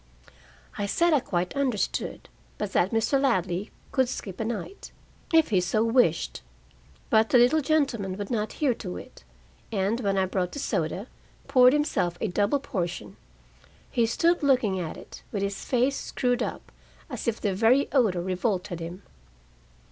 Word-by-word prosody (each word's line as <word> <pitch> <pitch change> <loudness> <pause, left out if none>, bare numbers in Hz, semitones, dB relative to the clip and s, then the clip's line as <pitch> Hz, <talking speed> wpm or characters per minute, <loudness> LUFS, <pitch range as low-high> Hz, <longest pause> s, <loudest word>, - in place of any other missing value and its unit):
I 200 - -1
said 340 +10 +2
I 295 - +5
quite 180 -2 -2
understood, 255 -8 -1 0.3
but 210 -2 -4
that 180 - +3
Mr. 225 +5 +1
Ladley 195 -6 0 0.2
could 260 -2 +2
skip 195 -7 -6
a - - 0
night, 235 - -5 0.4
if 325 -2 +4
he 190 -5 +3
so 205 +5 +1
wished. 235 +2 +2 0.7
But 220 0 +4
the - - +5
little 250 +6 +5
gentleman 265 -11 0
would 205 +1 -5
not 215 -2 -1
hear 280 -5 +1
to 90 - -6
it, - - -12 0.5
and 205 +2 0
when 200 -4 0
I 190 - +3
brought 185 -1 -2
the - - -6
soda, 285 - -2 0.4
poured 255 -1 +6
himself 235 - 0
a 220 - -1
double 205 +9 +1
portion. 180 -9 -4 0.8
He 235 -3 +2
stood 335 +9 +2
looking 250 -9 +2
at 165 -3 -5
it, - - -12
with 200 -2 -2
his 200 0 -3
face 255 +2 +1
screwed 245 -1 -1
up, - - -4 0.4
as - - -6
if 230 -1 0
the 200 -3 0
very 235 +8 +3
odor 210 -10 +2
revolted 185 -1 -2
him. 175 +4 -7
220 Hz, 165 wpm, -26 LUFS, 190-260 Hz, 0.8 s, poured